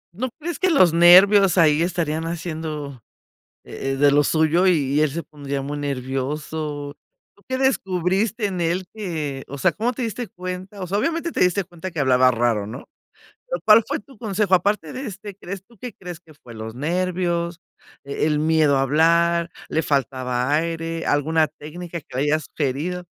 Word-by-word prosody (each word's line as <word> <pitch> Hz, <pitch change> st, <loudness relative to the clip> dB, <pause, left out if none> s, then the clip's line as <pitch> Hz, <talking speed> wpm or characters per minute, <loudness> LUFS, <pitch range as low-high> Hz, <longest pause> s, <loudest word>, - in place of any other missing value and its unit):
¿No 255 Hz, +5 st, -2 dB
crees 330 Hz, -1 st, -5 dB
que 370 Hz, -, +2 dB
los 185 Hz, -, +5 dB
nervios 185 Hz, +3 st, +7 dB
ahí 155 Hz, -2 st, +5 dB
estarían 165 Hz, -2 st, -1 dB
haciendo, 155 Hz, -5 st, -5 dB, 0.6 s
eh, 135 Hz, 0 st, -4 dB
de 145 Hz, +1 st, +5 dB
lo 145 Hz, +1 st, +4 dB
suyo 160 Hz, +4 st, +2 dB
y 185 Hz, -, +6 dB, 0.2 s
y 145 Hz, -, +2 dB
él 155 Hz, -1 st, +3 dB
se 165 Hz, +4 st, -4 dB
pondría 140 Hz, -3 st, -5 dB
muy 145 Hz, +1 st, -4 dB
nervioso?, 145 Hz, +2 st, -4 dB, 0.4 s
¿tú 200 Hz, -, -26 dB
qué 260 Hz, -, -1 dB
descubriste 205 Hz, -3 st, 0 dB
en 185 Hz, -3 st, -3 dB
él 175 Hz, +2 st, 0 dB
que?, 155 Hz, -10 st, -4 dB
o 140 Hz, -, -7 dB
sea, -, -, +2 dB
¿cómo 240 Hz, +4 st, -1 dB
te 255 Hz, -, -4 dB
diste 230 Hz, 0 st, -4 dB
cuenta?, 185 Hz, +2 st, -7 dB
o -, -, -3 dB
sea, 195 Hz, +3 st, -1 dB
obviamente 330 Hz, +7 st, -1 dB
te -, -, -3 dB
diste 180 Hz, +2 st, +2 dB
cuenta 175 Hz, +2 st, -8 dB
que 160 Hz, -, -4 dB
hablaba 130 Hz, -1 st, +4 dB
raro, 115 Hz, -4 st, 0 dB
¿no?, 110 Hz, -, -8 dB, 0.6 s
pero, 175 Hz, -, -3 dB
¿cuál 215 Hz, +2 st, +7 dB
fue -, -, -2 dB
tu 250 Hz, +1 st, -19 dB
consejo?, 205 Hz, -3 st, +1 dB
aparte 185 Hz, -2 st, +1 dB
de 265 Hz, +1 st, -6 dB
este, 205 Hz, 0 st, -8 dB
¿crees 195 Hz, -1 st, -8 dB
tú 235 Hz, -2 st, -22 dB
qué 240 Hz, +1 st, -7 dB
crees 175 Hz, -3 st, -9 dB
que 160 Hz, -3 st, -19 dB
fue 120 Hz, -4 st, -14 dB
los 110 Hz, 0 st, -7 dB
nervios, 170 Hz, +3 st, -1 dB, 0.5 s
e 140 Hz, +2 st, -2 dB
el 150 Hz, -1 st, +1 dB
miedo 155 Hz, -2 st, +3 dB
a 135 Hz, -, +2 dB
hablar, 170 Hz, +4 st, +3 dB, 0.2 s
le 160 Hz, -, +1 dB
faltaba 130 Hz, -2 st, -1 dB
aire, 165 Hz, +1 st, -2 dB
alguna 155 Hz, +2 st, +2 dB
técnica 170 Hz, +3 st, -8 dB
que 125 Hz, -, -8 dB
le 140 Hz, -, +1 dB
hayas 150 Hz, +1 st, +1 dB
sugerido? 155 Hz, +6 st, -2 dB
165 Hz, 185 wpm, -22 LUFS, 145-185 Hz, 0.6 s, nervios